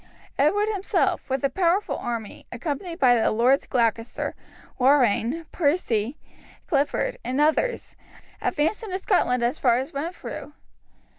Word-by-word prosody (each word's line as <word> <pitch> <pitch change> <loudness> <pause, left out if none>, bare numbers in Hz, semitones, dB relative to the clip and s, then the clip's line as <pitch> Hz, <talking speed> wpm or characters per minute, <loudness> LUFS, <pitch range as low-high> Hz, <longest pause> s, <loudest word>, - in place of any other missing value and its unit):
Edward 405 +10 +3
himself, 400 -8 0
with 265 0 -1
a 275 - +3
powerful 365 +5 +1
army, 230 -3 -5
accompanied 315 - -4
by 255 -6 +5
the 230 -2 +3
Lords 245 +5 +2
Gloucester, 230 -2 -1 0.5
Warrenne, 265 +3 +3
Percy, 285 - 0 0.5
Clifford, 335 - 0
and 260 +2 -2
others, 315 +12 +1 0.5
advanced 320 +10 0
into 390 -5 -3
Scotland 250 - +1
as 245 +6 0
far 240 -3 +3
as 265 +2 -4
Renfrew. 295 0 -6
280 Hz, 125 wpm, -24 LUFS, 245-345 Hz, 0.5 s, by